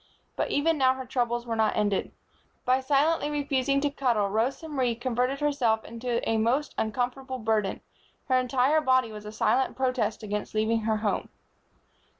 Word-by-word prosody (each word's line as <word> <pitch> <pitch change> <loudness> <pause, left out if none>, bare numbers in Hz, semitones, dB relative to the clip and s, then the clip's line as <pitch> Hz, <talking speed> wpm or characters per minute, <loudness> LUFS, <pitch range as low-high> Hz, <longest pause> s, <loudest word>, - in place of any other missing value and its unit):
But - - -1
even 310 +1 +1
now 260 -1 +4
her 260 0 -6
troubles 240 -1 -1
were 230 -1 -2
not 220 -1 +2
ended. 205 -2 0 0.5
By 255 +1 +3
silently 290 +3 +2
refusing 275 -2 0
to 290 0 0
cuddle, 240 -8 +1
Rosa 240 - -1
Marie 260 -6 0
converted 250 +3 -1
herself 250 -7 +1
into 235 +1 -3
a 225 - +2
most 255 +7 +1
uncomfortable 250 +4 -2
burden. 215 -4 0 0.5
Her 255 -2 +3
entire 260 +4 +2
body 255 -5 +2
was 210 -1 -9
a - - -6
silent 255 +4 +1
protest 250 -5 -1
against 210 0 -4
leaving 220 +1 +2
her 220 0 0
home. 205 - -1
250 Hz, 160 wpm, -27 LUFS, 220-270 Hz, 0.5 s, now